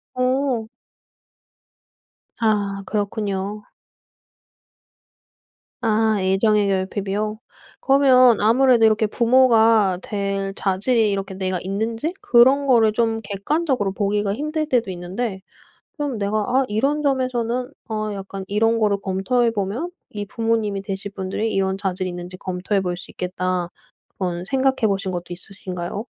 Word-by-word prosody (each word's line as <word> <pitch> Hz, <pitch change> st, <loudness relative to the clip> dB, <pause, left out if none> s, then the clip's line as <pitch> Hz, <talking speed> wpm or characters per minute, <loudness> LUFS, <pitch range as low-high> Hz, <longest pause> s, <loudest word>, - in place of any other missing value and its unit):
오. 255 Hz, -2 st, 0 dB, 1.7 s
아 205 Hz, -3 st, 0 dB
그렇군요. 205 Hz, -1 st, -3 dB, 2.2 s
아 220 Hz, -1 st, +2 dB
애정의 200 Hz, +2 st, +2 dB
결핍이요. 200 Hz, +2 st, -2 dB, 0.4 s
그러면 255 Hz, -4 st, +5 dB
아무래도 235 Hz, +1 st, +5 dB
이렇게 215 Hz, 0 st, +3 dB
부모가 225 Hz, -5 st, +4 dB
될 195 Hz, -1 st, -3 dB
자질이 210 Hz, +3 st, +1 dB
이렇게 195 Hz, -1 st, -3 dB
내가 185 Hz, -1 st, -2 dB
있는지 225 Hz, -, -2 dB
그런 260 Hz, +4 st, +5 dB
거를 230 Hz, -5 st, +4 dB
좀 225 Hz, -1 st, 0 dB
객관적으로 205 Hz, -, -1 dB
보기가 200 Hz, 0 st, 0 dB
힘들 305 Hz, +4 st, -2 dB
때도 235 Hz, -7 st, +1 dB
있는데 190 Hz, +3 st, -4 dB, 0.5 s
그럼 290 Hz, -6 st, -3 dB
내가 205 Hz, +1 st, -1 dB
'아 255 Hz, +5 st, +1 dB
이런 275 Hz, +8 st, 0 dB
점에서는 255 Hz, -3 st, -1 dB, 0.2 s
어 215 Hz, -1 st, -2 dB
약간 195 Hz, 0 st, -7 dB
이런 225 Hz, +3 st, +2 dB
거를 205 Hz, -2 st, +2 dB
검토해보면 225 Hz, -, -1 dB, 0.2 s
이 205 Hz, -1 st, -5 dB
부모님이 225 Hz, -2 st, -1 dB
되실 195 Hz, 0 st, -5 dB
분들이 195 Hz, +3 st, -3 dB
이런 190 Hz, 0 st, 0 dB
자질이 185 Hz, -1 st, -2 dB
있는지 175 Hz, +1 st, -7 dB
검토해 185 Hz, +2 st, -2 dB
볼 180 Hz, -1 st, -3 dB
수 175 Hz, -, -5 dB
있겠다.' 180 Hz, -1 st, -2 dB, 0.5 s
그런 180 Hz, -2 st, -2 dB
생각해 265 Hz, 0 st, +1 dB
보신 195 Hz, -1 st, -1 dB
것도 175 Hz, -1 st, -5 dB
있으신가요? 185 Hz, +1 st, -6 dB
210 Hz, 280 characters per minute, -22 LUFS, 195-235 Hz, 2.2 s, 그러면